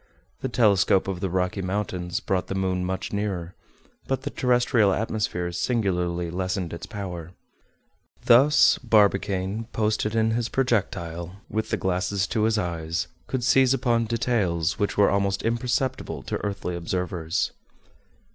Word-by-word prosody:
The 130 - -3
telescope 100 -5 +3
of 95 -2 -3
the 95 0 -2
Rocky 90 +2 -1
Mountains 90 -2 -2
brought 95 -2 -1
the 95 - -3
moon 95 -1 0
much 95 +2 -3
nearer; 95 -4 -2 0.5
but 135 - -1
the - - -3
terrestrial 120 -4 +3
atmosphere 100 -4 -1
singularly 90 -5 -1
lessened 90 -1 -2
its 85 - -7
power. 90 -4 -6 0.9
Thus 135 +6 +6
Barbicane, 100 -2 +2
posted 110 0 0
in 110 0 +2
his 115 0 -1
projectile, 90 -8 -1 0.2
with 110 0 -2
the - - 0
glasses 95 +2 0
to 110 -2 +1
his 110 0 +2
eyes, 85 -4 -2 0.2
could 130 -2 -2
seize 130 +1 +4
upon 120 -3 +1
details 105 -8 0
which 100 - -1
were 100 - +5
almost 100 0 0
imperceptible 125 +3 -1
to - - -3
earthly 100 -3 -3
observers. 85 -1 -2
100 Hz, 135 wpm, -25 LUFS, 90-115 Hz, 0.9 s, Thus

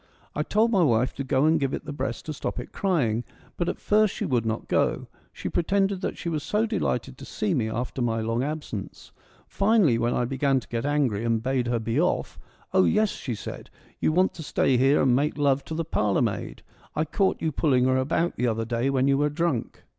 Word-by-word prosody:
I 150 - -1
told 215 +8 +2
my 195 -5 +3
wife 125 -5 +2
to 140 - -4
go 130 +1 +2
and 160 +1 +4
give 135 -2 0
it - - -8
the 145 - -5
breast 130 -4 -4
to 155 - -4
stop 140 - -4
it 125 - -8
crying, 125 - 0 0.3
but 175 - -1
at - - -4
first 210 -1 +2
she - - -2
would 120 -4 0
not 110 0 -3
go: - - +1 0.3
she - - -6
pretended 195 +2 0
that - - -3
she - - -6
was 160 -3 -1
so 210 +8 0
delighted 135 - -2
to - - -10
see 210 +4 -2
me 115 -7 0
after 125 +3 -3
my 115 -2 0
long 115 +2 -1
absence. 145 -9 -6 0.3
Finally, 195 - +3
when 120 +1 +1
I 120 - +1
began 135 +1 +1
to - - -14
get 115 +3 -2
angry 135 -8 +1
and 115 -1 0
bade 130 -1 0
her 120 0 +1
be 115 +5 0
off, 180 - -1 0.2
' - - -32
Oh, 190 0 +5
yes,' 215 -1 +2
she 120 - -5
said, - - -8 0.2
' - - -30
you - - +3
want 185 +4 +2
to 165 - -9
stay 140 -3 +1
here 135 +4 +4
and 130 -2 +4
make 145 +3 0
love 140 -2 +2
to 160 - -5
the 165 0 -2
parlourmaid; 105 -5 -1 0.3
I 155 - +1
caught 190 +5 0
you 160 - -1
pulling 130 -4 +2
her 130 0 +3
about 165 +6 0
the 125 - +1
other 115 -1 -1
day 120 +3 0
when 135 0 +2
you 140 0 +3
were 150 0 +2
drunk.' 150 -5 -2
135 Hz, 235 wpm, -26 LUFS, 120-165 Hz, 0.3 s, Oh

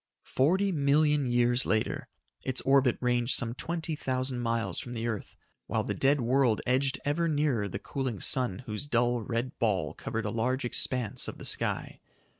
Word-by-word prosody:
Forty 185 +9 +3
million 150 -2 +3
years 120 +1 +3
later, 110 0 -1 0.4
its 130 -1 +1
orbit 135 -2 +3
ranged 120 0 +1
some 115 -2 -1
twenty 165 +3 -3
thousand 130 -2 -2
miles 115 -6 -1
from 120 - -7
the 115 -1 -3
earth 110 -3 -4 0.3
while - - 0
the - - -2
dead 140 0 +2
world 120 -2 +3
edged 135 +2 +1
ever 160 +4 +1
nearer 145 -9 +1
the 100 - -4
cooling 130 -1 -4
sun 125 -2 +2
whose 105 +5 -5
dull, 120 -2 +1
red 115 +4 -3
ball 100 - 0
covered 115 0 -4
a 105 - -1
large 125 +4 0
expanse 120 -2 -1
of - - -6
the - - -9
sky. - - -2
125 Hz, 170 wpm, -29 LUFS, 115-140 Hz, 0.4 s, Forty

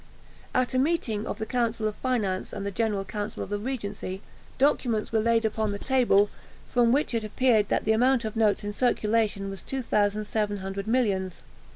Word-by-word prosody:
At 255 0 +1
a 255 - +2
meeting 260 -8 0
of - - -3
the 220 - -3
Council 230 -2 0
of 215 - -2
Finance 215 -8 -1
and 200 -1 -4
the 200 - -2
General 205 -2 -1
Council 210 +1 -4
of - - -9
the 205 - -1
Regency, 205 -5 -5 0.3
documents 245 -6 +1
were 225 - +2
laid 230 0 +2
upon 220 0 0
the 200 - -3
table, 220 -5 +3 0.3
from 240 -1 +3
which 280 0 +1
it 230 -1 0
appeared 215 -1 +2
that - - +1
the - - +3
amount 245 +2 +3
of 220 - -4
notes 220 -2 +2
in 205 0 -3
circulation 215 -3 +1
was 195 -2 -7
2700 205 -4 -1
millions. 200 -7 0
220 Hz, 180 wpm, -27 LUFS, 205-240 Hz, 0.3 s, table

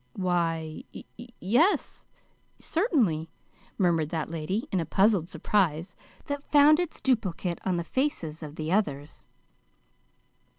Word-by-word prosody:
"Why, 165 -4 -1
y - - -8 0.4
yes, 250 - +1 0.5
certainly," 230 - 0 0.5
murmured 165 -5 +2
that 160 -1 -3
lady, 170 +7 -3
in 190 - +1
a - - 0
puzzled 195 -2 +3
surprise 175 -5 0 0.3
that 285 0 -3
found 300 +2 +7
its 350 -3 -3
duplicate 195 -8 -1
on 185 -2 +1
the 170 - -1
faces 170 - -2
of 150 -1 -8
the 155 +1 -4
others. 150 -8 -2
180 Hz, 120 wpm, -27 LUFS, 160-230 Hz, 0.5 s, found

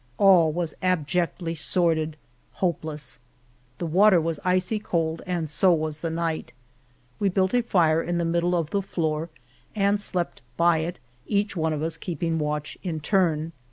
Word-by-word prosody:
All 180 -5 +6
was 165 -1 -2
abjectly 175 -1 0
sordid 160 -1 0 0.2
— - - -38
hopeless. 150 -7 -2 0.6
The 175 - -3
water 185 +3 +5
was 165 -2 -2
icy 185 +3 +1
cold 165 -5 -1
212 - - -10
The - - -13
Morena 180 -1 0
and 160 - -4
so 180 +4 +4
was 155 -2 -1
the 165 - -2
night 165 -1 -2 0.7
We 200 - +2
built 190 +1 +1
a 245 - +4
fire 165 -8 +3
in 175 0 -2
the 170 - 0
middle 170 +1 +1
of 165 -3 -1
the 200 - +1
floor 160 -3 -2 0.5
and 200 0 +2
slept 180 -4 -2 0.2
by 170 -1 +4
it, 170 +3 -3 0.3
each 205 0 0
one 160 -2 0
of 155 -1 -2
us 165 0 -2
keeping 165 -1 -2
watch 150 0 -3
in 170 -4 -3
turn. 165 -2 +1
170 Hz, 180 wpm, -25 LUFS, 160-185 Hz, 0.7 s, All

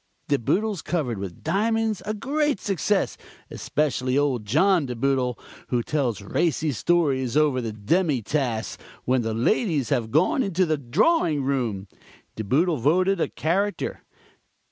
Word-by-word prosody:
De 140 -1 +2
Boodles 200 - 0
covered 130 - -2
with 95 -3 -7
diamonds, 220 +4 0
a 215 - -1
great 290 +1 0
success, 195 +1 0 0.3
especially 135 -3 -1
old 135 -6 0
John 160 - +3
De 125 - -4
Boodle, 125 -1 0 0.3
who 120 -2 0
tells 125 -9 -1
racy 155 - 0
stories 135 -3 +1
over 145 -4 +3
the 115 -2 -3
demi 130 - 0
tasse 120 -4 -2 0.3
when 130 0 +2
the 110 -1 -2
ladies 150 - +1
have 120 -6 0
gone 185 - +2
into 190 -5 +1
the 155 -3 0
drawing 150 - +2
room. 120 -8 -1 0.5
De 110 - -4
Boodle 155 - +2
voted 180 +8 +2
a - - +2
character. 195 +6 -2
145 Hz, 145 wpm, -24 LUFS, 125-185 Hz, 0.5 s, John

